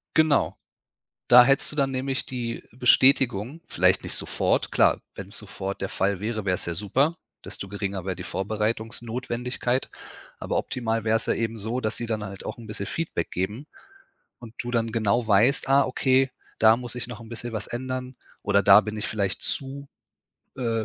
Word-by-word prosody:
Genau. 155 -2 +3 0.7
Da 125 0 +9
hättest 135 +2 +2
du - - -9
dann 135 -2 +2
nämlich 130 0 -2
die 120 -2 -4
Bestätigung, 125 +1 +3
vielleicht - - +3
nicht - - -3
sofort, - - 0
klar, - - +4 0.2
wenn's - - -6
sofort 95 +1 -5
der 95 - -2
Fall 95 0 0
wäre, 110 0 -3
wäre 90 -2 +2
es - - -4
ja 85 - -2
super, 135 - +1 0.3
desto 100 - -7
geringer 100 -2 -3
wäer 95 -2 -2
die 90 - -7
Vorbereitungsnotwendigkeit. 115 +5 -2 0.5
Aber - - -2
optimal 115 -2 -2
wäre 110 +1 +3
es 115 - -1
ja - - +3
eben 115 -1 -2
so, 110 +4 -2
dass 110 -3 -2
sie 120 - -3
dann 110 -2 -2
halt 100 -1 -8
auch - - -5
'n 115 -1 -11
bisschen 105 -1 -5
Feedback 155 - -3
geben 105 +10 -3 0.8
und 115 -1 -11
du 120 - -4
dann 115 -1 +1
genau 115 +1 +1
weißt: 115 +7 +3
„Ah, 140 +1 +5
okay, 130 0 +2 0.3
da 110 0 +6
muss 120 0 -5
ich 120 - -4
noch 125 -1 -9
'n 115 - -11
bisschen 120 0 -6
was 110 - -4
ändern“, 130 +1 -4 0.3
oder 100 0 +3
„Da 100 +1 +8
bin 105 0 -6
ich 105 - -3
vielleicht 100 -4 -2
zu, 140 +1 -2 0.7
äh, 115 -3 -1
115 Hz, 185 wpm, -25 LUFS, 105-130 Hz, 0.8 s, Da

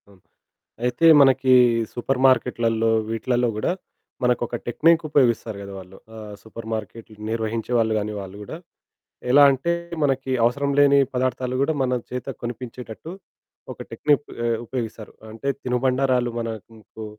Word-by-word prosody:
అవును, 100 -2 -21 0.6
అయితే 125 +6 +1 0.2
మనకి 130 -1 +4 0.4
సూపర్ 125 +2 -2
మార్కెట్లల్లో, 115 -3 +1 0.2
వీట్లల్లో 120 +2 0
గూడా 110 - 0 0.5
మనకొక 120 -1 0
టెక్నిక్ 165 +7 +3
ఉపయోగిస్తారు 120 -6 +1
గద 100 0 -8
వాళ్ళు. 95 0 -12 0.2
ఆహ్, 105 -1 -9
సూపర్ 110 0 -10
మార్కెట్లు 110 0 -7
నిర్వహించే 110 +1 -3
వాళ్ళు 110 -1 +2
గాని 105 +1 -4
వాళ్ళు 95 0 -9
గూడా, 130 +9 -7 0.7
ఎలా 145 +2 +7
అంటే 135 +6 -1 0.3
మనకి 135 -2 0
అవసరం 140 +4 0
లేని 140 0 +6 0.2
పదార్థాలు 125 0 -1
గూడా 160 +3 +1
మన 125 -1 0 0.2
చేత 125 +1 -5
కొనిపించేటట్టు 120 +3 -7 0.6
ఒక - - -23
టెక్నిప్ 145 -1 +1 0.2
ఆహ్, 115 -1 +1
ఉపయోగిస్తారు. 115 -3 -6 0.2
అంటే 115 +5 -4
తినుబండారాలు 125 0 +1
మనకు 110 -1 -8
120 Hz, 130 wpm, -23 LUFS, 110-130 Hz, 0.7 s, ఎలా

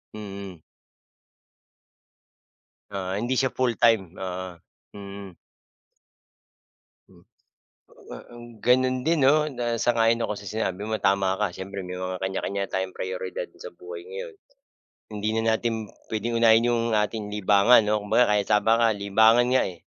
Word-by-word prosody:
Mm. 100 -4 -8 2.3
Oo, 95 -1 -3
hindi 120 +5 -1
siya 130 0 0
full 125 -3 -1
time. 110 -7 +3
Oo, 95 -2 -6 0.4
mm. 100 -2 -9 2.8
Ah, - - -11
mm. 120 0 -11
Gano'n 130 +1 +3
din 165 -1 +2
'no, 145 - +6 0.2
na 120 - -2 0.2
sang-ayon 115 -1 +2
ako - - -2
sa 100 - -11
sinabi 100 -4 -2
mo, 110 - -1
tama 95 -1 +2
ka. 105 - +3
Siyempre 100 +1 -7
may 90 0 -6
mga 95 0 -4
kanya-kanya 95 +1 -3
tayong 95 0 -3
prayoridad - - -4 0.2
sa 485 - -7
buhay 425 +3 -8
ngayon. 475 +1 -7 0.8
Hindi 105 +1 -2
na 110 0 0
natin 110 -1 -2 0.2
puwedeng 115 +2 -2
unahin 115 +1 +5
yung 120 -1 +1 0.2
ating 105 -1 -4
libangan, 105 +3 +5
'no, 105 0 0
kumbaga 110 +4 +3
kahit 100 -1 +1
tama 105 +1 +3
ka 115 - +5 0.2
libangan 110 +4 +4
nga, 130 - +4
eh. 85 - -16
110 Hz, 140 wpm, -25 LUFS, 100-120 Hz, 2.8 s, no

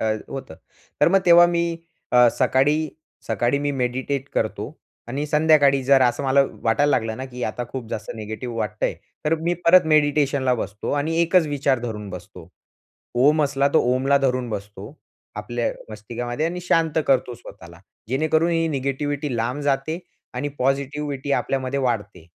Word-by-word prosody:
अ, - - -1 0.2
होतं. 135 -12 -7 0.5
तर - - +6
मग 195 +2 +4
तेव्हा 175 0 +8
मी 170 -1 -1 0.4
अ, 125 -1 +7
सकाळी 145 +4 +2 0.4
सकाळी 120 +4 0
मी 145 0 -1
मेडिटेट 130 +2 -2
करतो - - -2 0.4
आणि 140 +5 -3
संध्याकाळी 150 -3 +4
जर 135 -1 +5
असं 125 +3 +1
मला 135 +1 +4 0.2
वाटायला 120 +6 +2
लागलं 110 -3 0
ना, 130 - -5
की 125 -2 -8
आता 120 +3 -3
खूप 125 -4 -6
जास्त 105 - -5
निगेटिव्ह 110 +2 -6
वाटतंय, 105 -1 -2 0.3
तर 155 +2 +2
मी 170 +2 -1
परत 180 0 +6
मेडिटेशनला 145 -3 +2
बसतो 105 -2 -5
आणि 155 +3 -1
एकच 170 -1 +3
विचार 140 -3 0
धरून 110 -4 -5
बसतो. 90 -1 -10 0.7
ओम 150 +5 +4
असला 140 0 +1
तो - - +6
ओमला 135 +2 +2
धरून 130 -2 0
बसतो. 105 +3 -7 0.4
आपल्या 120 +3 -2 0.2
मस्तिकामध्ये 120 +7 -4
आणि 180 +1 -4
शांत 165 -3 +1
करतो 125 -2 +1
स्वतःला. 85 -7 -13 0.3
जेणेकरून 155 +6 +1
ही 165 -1 +1
निगेटिव्हिटी 140 0 -2
लांब 120 +5 -2
जाते 145 +4 -1 0.4
आणि 140 +4 -2
पॉझिटिव्हिटी 140 +1 -1
आपल्यामध्ये 135 0 -1
वाढते. 105 -9 -3
135 Hz, 155 wpm, -22 LUFS, 120-150 Hz, 0.7 s, तेव्हा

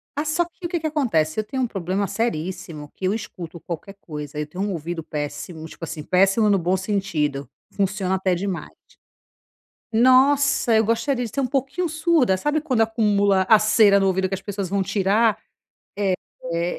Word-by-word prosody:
Ah 295 - -1
só 315 +3 +1
que 345 +1 -12
o - - -2
que 345 -1 -1
que 315 - -2
acontece, 215 - 0
eu - - 0
tenho 260 +5 -4
um - - +1
problema 195 -1 -2
seríssimo 165 -8 -3
que - - -14
eu 190 - +2
escuto 175 -6 -7
qualquer 175 +4 -7
coisa, 150 -3 -7
eu 150 - -3
tenho 180 +6 -4
um 205 - -1
ouvido 165 -1 -4
péssimo, 150 +2 -5
tipo 165 - -13
assim 165 -1 -5
péssimo 195 +5 +3
no 200 - +4
bom 180 +1 +1
sentido, 165 - -2 0.2
funciona 195 -1 0
até 190 -1 +1
demais. 185 +1 -3 1.2
Nossa, 260 +1 +4
eu 220 0 +4
gostaria 245 +3 0
de 230 - -5
ser 275 - -1
um - - +1
pouquinho 275 +7 -1
surda, 315 - +2
sabe 295 +9 0
quando 265 -7 0
acumula 205 -3 +3
a 220 - +8
cera 215 -2 +5
no 195 - +2
ouvido 190 0 +1
que 195 - -2
as 190 - -6
pessoas 200 -2 -4
vão 195 +1 0
tirar, 200 +3 +2 1.1
eh 170 +1 -1
200 Hz, 185 wpm, -23 LUFS, 175-235 Hz, 1.2 s, a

